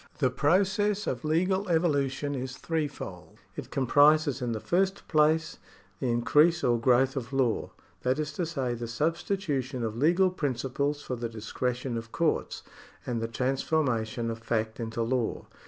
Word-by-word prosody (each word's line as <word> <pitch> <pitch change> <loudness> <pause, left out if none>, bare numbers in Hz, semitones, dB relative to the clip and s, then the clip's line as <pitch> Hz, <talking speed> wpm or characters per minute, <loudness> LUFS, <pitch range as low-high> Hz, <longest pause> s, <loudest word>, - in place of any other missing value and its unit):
The 130 -4 +2
process 195 +8 +2
of - - -3
legal 185 +5 +1
evolution 145 -4 +1
is 130 0 -5
threefold. 140 - -4 0.2
It - - -7
comprises 145 +1 +4
in 120 -1 -1
the 110 - -2
first 190 - 0
place 160 +2 +2 0.4
the 130 - -1
increase 150 +8 +3
or 120 -1 +3
growth 130 +2 +3
of 125 -2 -4
law 130 -4 0 0.2
— - - -34
that 130 +2 +1
is 150 -1 -3
to 170 +2 -2
say, 135 -7 -2
the 120 0 -5
substitution 145 - -1
of 110 -1 -2
legal 175 +8 +3
principles 140 -2 -2
for 130 - -3
the 120 -1 -4
discretion 120 +3 -3
of 115 0 -7
courts, 165 -2 -1 0.4
and 120 -2 -2
the 115 - -1
transformation 125 -2 0
of 115 - -6
fact 110 0 -2
into 115 0 -2
law. 120 -1 -1
135 Hz, 155 wpm, -28 LUFS, 120-160 Hz, 0.4 s, comprises